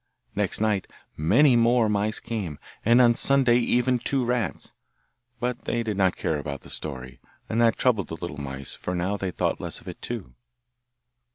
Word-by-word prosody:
Next - - 0
night 105 -3 0 0.2
many 125 - +4
more 120 0 +4
mice 105 +1 0
came, 100 -10 -4 0.3
and 120 +3 +5
on 120 -2 +6
Sunday 125 -1 +4
even 125 +1 +2
two 130 +1 +1
rats; 120 -6 -2 0.7
but 125 0 -3
they 120 0 0
did 110 -2 -2
not 95 -2 +2
care 75 - -1
about 70 -1 -5
the - - -11
story, 65 -4 -6 0.3
and 115 +1 0
that 115 -1 +4
troubled 110 -9 +2
the 80 - -5
little 85 -4 -6
mice, 70 -1 -5
for 90 - -4
now 90 +3 -1
they 95 -2 -3
thought 90 - -1
less - - -6
of - - -19
it - - -8
too. - - -6
110 Hz, 180 wpm, -25 LUFS, 85-120 Hz, 0.7 s, on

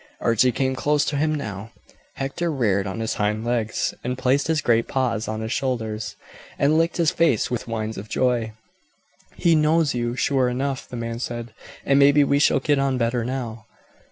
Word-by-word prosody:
Archie 115 +2 +3
came 130 +3 -1
close 145 +2 +1
to 150 - -2
him 155 +2 +1
now. 105 -6 -5 0.5
Hector 140 +5 -2
reared 105 -8 +1
on 95 +4 -4
his 110 - -1
hind 105 +2 -1
legs, 115 -2 -1
and 125 +1 -2
placed 135 +2 +1
his 160 -1 +1
great 115 -4 +2
paws 120 -4 -1
on 110 0 -3
his 110 0 -4
shoulders, 110 -5 -3 0.4
and 145 +2 +3
licked 165 +1 +1
his 170 -2 +3
face 165 - +1
with 120 - -3
whines 110 -1 -3
of 105 +2 -10
joy. 120 -4 0 0.8
"He 170 - +3
knows 155 -1 +3
you, 120 0 -2
sure 130 -1 +1
enough," 135 +2 -3
the 125 - -6
man 115 0 -4
said; 120 -2 -5 0.3
"and 140 0 +4
maybe 145 +1 +6
we 140 0 +2
shall 145 - +4
get 145 +1 +1
on 135 -1 +1
better 120 0 0
now. 120 -3 -5
125 Hz, 185 wpm, -23 LUFS, 115-140 Hz, 0.8 s, maybe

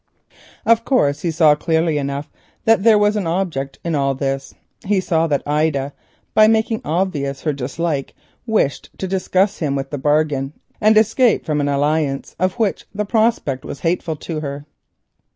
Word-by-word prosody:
Of 230 0 +4
course, 145 - +1
he 175 - -1
saw 160 -2 +5
clearly 160 0 0
enough 140 +1 -4 0.3
that 225 -2 +4
there 220 0 +6
was 210 0 +3
an 200 -5 -1
object 165 -6 -2
in 170 - -1
all 140 -2 +1
this—he 135 +8 -3
saw 165 -3 +1
that 145 -3 0
Ida, 145 -2 0 0.4
by 215 0 +6
making 220 0 +1
obvious 150 -5 -2
her 150 - 0
dislike, 140 +2 -3 0.3
wished 215 -11 0
to 190 - -3
disgust 190 +1 0
him 145 -4 -1
with 135 0 -4
his 145 -3 -4
bargain, 145 -2 +1 0.3
and 215 +1 +5
escape 220 +2 +3
from 150 -2 0
an 145 - 0
alliance 145 0 0
of 185 0 +1
which 220 -4 -1
the 210 +1 -1
prospect 215 - +1
was 140 - -8
hateful 165 -1 -1
to 155 +1 -5
her. 140 -1 -6
160 Hz, 165 wpm, -19 LUFS, 140-195 Hz, 0.4 s, there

